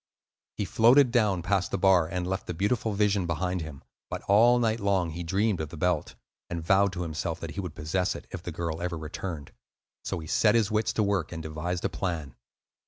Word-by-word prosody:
He - - -1
floated 125 +3 +5
down 105 -8 +2
past 95 0 +1
the - - -1
bar, 90 -3 +4
and 90 +1 -3
left 95 +1 -3
the 90 - -4
beautiful 105 +4 0
vision 100 -3 +1
behind 90 +2 -1
him; 80 -4 -8 0.3
but - - -5
all 115 +5 +5
night 115 -1 +1
long 95 -5 +1
he 85 +2 -6
dreamed 95 +2 0
of 80 - -4
the 80 - -9
belt, 90 -1 0 0.3
and 85 -2 -4
vowed 100 +2 +4
to 90 - -3
himself 80 0 -3
that 85 - -6
he 100 - -6
would 90 -4 -7
possess 90 +4 -1
it, - - -8
if 90 - -6
the 85 - -6
girl 85 0 -4
ever 90 -1 -2
returned; 80 -1 -6 0.5
so - - -3
he 80 - -7
set 105 +8 +3
his 110 -2 +2
wits 110 +1 +1
to 110 - +1
work 100 -6 0
and 80 -1 -6
devised 80 +3 -3
a - - +1
plan. 80 -8 -3
90 Hz, 220 wpm, -28 LUFS, 80-100 Hz, 0.5 s, floated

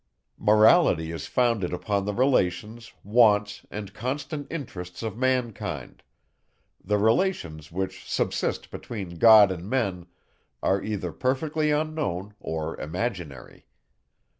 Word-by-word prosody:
Morality 105 - +4
is 80 -3 -6
founded 115 -7 +1
upon 100 +2 -1
the 105 - -2
relations, 115 -2 0
wants, 105 -1 +3
and 100 -1 -7
constant 140 +5 -4
interests 90 - -6
of 110 - -3
mankind; 125 -3 -2 0.8
the 105 +2 +1
relations, 105 - 0
which 95 +2 -5
subsist - - -1
between 95 -7 -7
God 110 -4 +8
and 90 +2 -6
Men, 100 -9 -1 0.6
are 95 0 +2
either 100 -5 -3
perfectly 150 - 0
unknown, 150 - -2
or 80 0 -4
imaginary. 85 - -5
105 Hz, 110 wpm, -26 LUFS, 90-125 Hz, 0.8 s, God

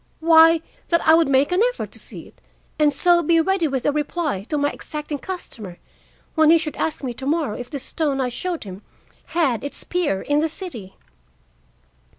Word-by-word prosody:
Why, 325 0 +6 0.3
that 335 -2 +1
I 320 - +8
would 325 -1 +5
make 275 +3 +2
an 360 +3 +2
effort - - -7
to - - -9
see - - -8
it - - -19 0.4
and 300 -1 +4
so 345 +4 +3
be 330 +1 +3
ready 360 0 +1
with 270 -3 -3
a - - +3
reply 295 - -2
to 300 - 0
my 290 0 +1
exacting 300 -1 -6
customer 225 - -7 0.6
when 315 -1 +4
he 335 - +7
should 310 -2 -4
ask 315 - -2
me 250 -2 -3
to 265 +3 -6
morrow 300 -7 0
if 245 0 -7
the 285 - -4
stone 275 +1 -2
I 255 -1 0
showed 340 +7 -3
him 195 -1 -9 0.6
had 275 -9 +1
its 285 - -6
peer 340 - -1
in 290 0 +1
the 320 +1 +1
city. 245 - -8
300 Hz, 195 wpm, -22 LUFS, 270-330 Hz, 0.6 s, I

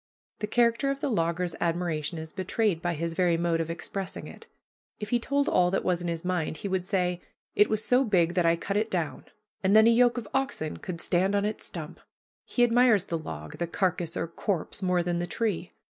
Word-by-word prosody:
The 210 - -2
character 235 +4 +2
of 275 0 -1
the 275 - -1
logger's 170 -2 0
admiration 170 -1 -1
is 160 0 -7
betrayed 190 -1 0
by 175 -1 -1
his 165 +2 -2
very 175 -1 +2
mode 170 -1 +1
of 165 - -4
expressing 185 +3 -4
it. - - -12 0.5
If 210 0 -6
he 240 - +3
told 280 +4 0
all 180 0 +3
that 195 - 0
was 180 -1 0
in 175 - -3
his 170 0 -3
mind, 175 -4 -1
he 200 - -4
would 185 -1 -1
say, 180 -3 0 0.3
"It 210 - +4
was 215 0 0
so 250 +2 +4
big 175 -7 +2
that 175 -1 +2
I 165 0 +4
cut 195 +4 -2
it 220 +1 0
down, 170 -5 -3 0.4
and 190 +2 +4
then 220 0 +8
a 230 - +6
yoke 240 +1 +4
of 230 -4 -4
oxen 270 - -1
could 170 -2 -6
stand 190 +3 +1
on 200 0 +1
its 210 +1 -2
stump." - - -7 0.5
He 245 - +1
admires 240 -4 +4
the 170 -3 -3
log, 75 - -8
the 170 - -1
carcass 175 -1 -1
or - - -1
corpse, 175 +2 -3
more 180 -2 +2
than 175 0 -1
the 175 - -2
tree. 190 -3 -2
180 Hz, 220 wpm, -28 LUFS, 170-215 Hz, 0.5 s, then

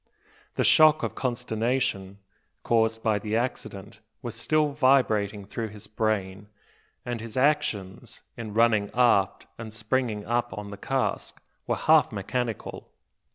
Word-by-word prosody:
The - - +1
shock 155 -1 +6
of - - -2
consternation 115 -5 -2 0.5
caused 115 -1 +1
by 110 -2 +2
the 105 +1 -3
accident 110 -3 -4 0.2
was 120 -3 -5
still 150 +6 +1
vibrating 115 -8 +2
through 110 +3 -4
his 105 0 -11
brain; 105 -2 -2 0.6
and 120 -2 -4
his 115 +1 -7
actions, 130 -9 -1
in 110 -3 -7
running 110 -3 +3
aft, 115 -6 +3
and 115 -1 -7
springing 110 -1 -2
up 120 -3 -1
on 105 -1 -6
the - - -6
cask, 135 +5 -2 0.3
were - - +1
half - - +4
mechanical. 125 -4 -4
115 Hz, 130 wpm, -26 LUFS, 105-125 Hz, 0.6 s, shock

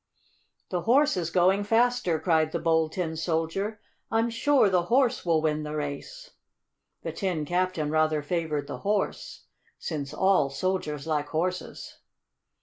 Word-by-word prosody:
"The 180 -2 -1
Horse 280 - +3
is 170 -3 -2
going 185 +3 +3
faster!" 225 -6 +2
cried 160 -3 +2
the - - -1
Bold 160 -1 +1
Tin 165 -3 -2
Soldier. 165 +6 -2 0.3
"I'm 225 +1 +1
sure 270 +1 +3
the 180 -3 +2
Horse 250 +3 +2
will 165 -3 +2
win 155 -1 0
the 150 0 -5
race!" 150 - -6 0.7
The - - -3
Tin 180 -7 -2
Captain 175 -3 -1
rather 155 -1 +2
favored 155 -2 -2
the - - -7
Horse, 205 0 -2 0.3
since 145 -4 -4
all 185 -3 +2
soldiers 150 -2 -2
like 150 -2 -1
horses. 180 +4 -4
170 Hz, 145 wpm, -27 LUFS, 155-200 Hz, 0.7 s, Horse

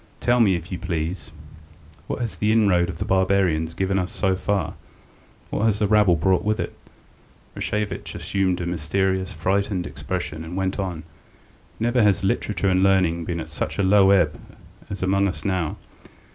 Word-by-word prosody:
Tell 120 0 +2
me, 100 -5 +4
if 85 +2 -6
you 90 - -4
please, 80 0 -3 0.8
what - - -3
has 115 -3 -4
the 105 +1 +2
inroad 100 -6 +3
of 90 - -5
the - - -3
barbarians 95 -4 +1
given 95 +1 0
us 90 -1 -3
so 95 -2 0
far? 95 -2 -1 0.8
What 110 - 0
has 110 -2 +2
the 105 -1 +1
rabble 105 -4 +4
brought 90 +2 +2
with 105 +1 0
it?" - - -3 0.8
Rashevitch 105 0 -3
assumed 95 -2 0
a - - -2
mysterious, 95 +3 -1
frightened 100 -2 -1
expression, 80 +2 -5
and 85 +3 -6
went 95 +1 -1
on: 90 -5 -3 0.8
"Never 120 +2 +2
has 100 -2 +3
literature 95 0 0
and 95 -1 +3
learning 90 -4 +2
been 85 0 -3
at 80 -1 -7
such 75 - -4
low 95 0 +5
ebb 90 -6 +3 0.6
among 100 +1 +2
us 90 -5 -3
as - - -16
now. 90 -5 -1
95 Hz, 170 wpm, -23 LUFS, 85-100 Hz, 0.8 s, low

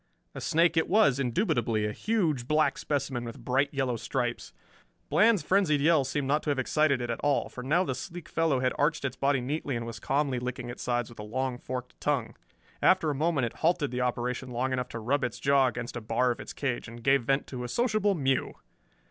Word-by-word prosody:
A - - -7
snake 165 +1 +2
it 160 - +3
was, 150 - +4
indubitably, 120 - 0
a 105 - -1
huge 160 - 0
black 155 +1 +2
specimen 135 -4 -2
with 115 -1 -8
bright 135 +3 +1
yellow 135 -4 -1
stripes. - - -3 0.6
Bland's 215 -3 +4
frenzied 185 -7 +3
yell 155 0 +4
seemed 135 +1 -2
not 150 +2 +2
to - - -3
have 145 - +1
excited 140 0 +2
it 120 - -2
at 115 - -4
all, 145 -2 +1
for 125 - -8
now 155 +8 +2
the 135 - -2
sleek 170 +3 -7
fellow 160 -6 +1
had 130 0 +1
arched 150 0 +1
its 130 -1 -2
body 135 0 +1
neatly 140 +1 -2
and 115 0 -3
was 115 -3 -7
calmly 135 +1 0
licking 125 0 -4
its 120 - -9
sides 120 -1 -1
with 120 - -14
a - - -5
long 125 +3 -3
forked 125 -1 -6
tongue. 140 -6 -1 0.5
After 180 -5 +4
a - - -1
moment 150 -2 +1
it 115 - -4
halted 160 -4 +1
the 125 0 -2
operation 125 +1 -2
long 125 +2 -1
enough 125 -1 -2
to 115 - -6
rub 135 +5 0
its 125 -3 -3
jaw 140 -1 +4
against 125 -1 -4
a 120 - -4
bar 115 +3 +1
of 120 - -4
its - - -7
cage, 130 -4 -3
and 115 0 -10
gave 135 +2 +4
vent 135 +2 +1
to 125 -2 -6
a - - -3
sociable 215 - +1
mew! 135 -4 0
135 Hz, 225 wpm, -28 LUFS, 125-155 Hz, 0.6 s, was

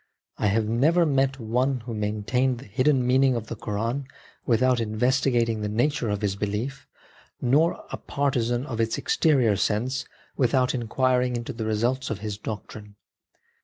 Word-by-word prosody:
I 105 - +2
have 105 +2 +1
never 155 +10 +3
met 135 -2 +1
one 125 +3 0
who 115 0 -6
maintained 110 +5 0
the 130 - -11
hidden 130 +4 +2
meaning 130 +1 +3
of 115 -2 -3
the 115 - -6
Koran 115 +6 -3 0.4
without 125 +1 +3
investigating 115 0 +1
the 105 - -2
nature 120 +2 0
of 105 0 -2
his 100 -2 0
belief, 105 +7 -4 0.5
nor 145 +7 +2
a - - -3
partisan 125 -3 -1
of 115 -5 -3
its 115 0 0
exterior 130 -10 +2
sense 125 +6 -1 0.3
without 125 0 +2
inquiring 125 +1 +1
into 120 0 -4
the 110 -1 -4
results 120 +5 0
of 110 - -2
his 105 -1 -4
doctrine. 105 -1 -7
120 Hz, 155 wpm, -25 LUFS, 110-130 Hz, 0.5 s, never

